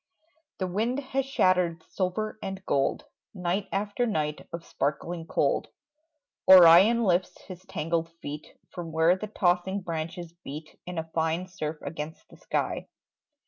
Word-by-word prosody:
The 190 Hz, -, -1 dB
wind 220 Hz, +8 st, -1 dB
has 270 Hz, -1 st, -2 dB
shattered 180 Hz, -, +2 dB
silver 215 Hz, +4 st, -2 dB
and 190 Hz, -1 st, -6 dB
gold. 135 Hz, -1 st, 0 dB, 0.3 s
Night 185 Hz, +2 st, -1 dB
after 205 Hz, +5 st, -1 dB
night 150 Hz, -7 st, -2 dB
of 170 Hz, 0 st, -6 dB
sparkling 165 Hz, +4 st, -3 dB
cold, 145 Hz, -, +1 dB, 0.8 s
Orion 190 Hz, +6 st, +9 dB
lifts 180 Hz, -2 st, +1 dB
his 185 Hz, -1 st, -10 dB
tangled 165 Hz, +1 st, -1 dB
feet 150 Hz, 0 st, -8 dB
From 170 Hz, -3 st, -6 dB
where 160 Hz, +2 st, +4 dB
the 215 Hz, +3 st, -5 dB
tossing 190 Hz, -1 st, +1 dB
branches 165 Hz, 0 st, -5 dB
beat 155 Hz, +3 st, -9 dB
In 180 Hz, -1 st, -5 dB
a 160 Hz, 0 st, -4 dB
fine 165 Hz, +2 st, 0 dB
surf 155 Hz, -4 st, -5 dB
against 150 Hz, +2 st, -6 dB
the -, -, -16 dB
sky. -, -, -2 dB
175 Hz, 140 wpm, -27 LUFS, 160-195 Hz, 0.8 s, Orion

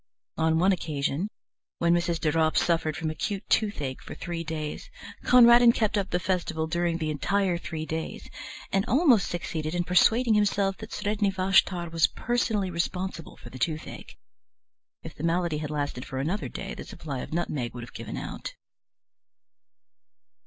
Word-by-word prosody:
On 160 Hz, 0 st, +2 dB
one 185 Hz, +4 st, +4 dB
occasion, 155 Hz, +1 st, -1 dB, 0.5 s
when 170 Hz, 0 st, +3 dB
Mrs. 170 Hz, -1 st, +1 dB
de 155 Hz, -2 st, +1 dB
Ropp 160 Hz, 0 st, +2 dB
suffered 165 Hz, -3 st, +1 dB
from 160 Hz, -2 st, -2 dB
acute 195 Hz, +5 st, -4 dB
toothache 150 Hz, -12 st, 0 dB
for -, -, -9 dB
three 170 Hz, -1 st, -4 dB
days, 155 Hz, -, -5 dB, 0.4 s
Conradin 240 Hz, -1 st, +8 dB
kept 220 Hz, -2 st, 0 dB
up 200 Hz, -2 st, 0 dB
the 180 Hz, -, 0 dB
festival 170 Hz, -3 st, -1 dB
during 170 Hz, +1 st, 0 dB
the 155 Hz, -2 st, -2 dB
entire 185 Hz, +5 st, +1 dB
three 160 Hz, -2 st, -5 dB
days, 160 Hz, 0 st, -5 dB, 0.4 s
and 195 Hz, -, +2 dB
almost 255 Hz, -, +4 dB
succeeded 160 Hz, -2 st, -3 dB
in 175 Hz, -, +1 dB
persuading 220 Hz, +7 st, +4 dB
himself 200 Hz, -2 st, +2 dB
that 220 Hz, -, -9 dB
Sredni 205 Hz, -1 st, 0 dB
Vashtar 185 Hz, -2 st, +2 dB
was 165 Hz, -1 st, +4 dB
personally 220 Hz, -5 st, -1 dB
responsible 180 Hz, 0 st, -3 dB
for -, -, -12 dB
the 130 Hz, -, -9 dB
toothache. 155 Hz, +5 st, -4 dB, 0.9 s
If 160 Hz, -, -8 dB
the 145 Hz, -, -9 dB
malady 170 Hz, -2 st, +1 dB
had 150 Hz, -1 st, -4 dB
lasted 145 Hz, -4 st, -3 dB
for 130 Hz, -, -6 dB
another 165 Hz, +10 st, -2 dB
day 195 Hz, -, -6 dB
the -, -, -7 dB
supply 140 Hz, -4 st, -6 dB
of -, -, -7 dB
nutmeg 145 Hz, -8 st, -2 dB
would 120 Hz, -, -6 dB
have 115 Hz, -, -11 dB
given -, -, -6 dB
out. -, -, -6 dB
170 Hz, 160 wpm, -27 LUFS, 155-195 Hz, 0.9 s, Conradin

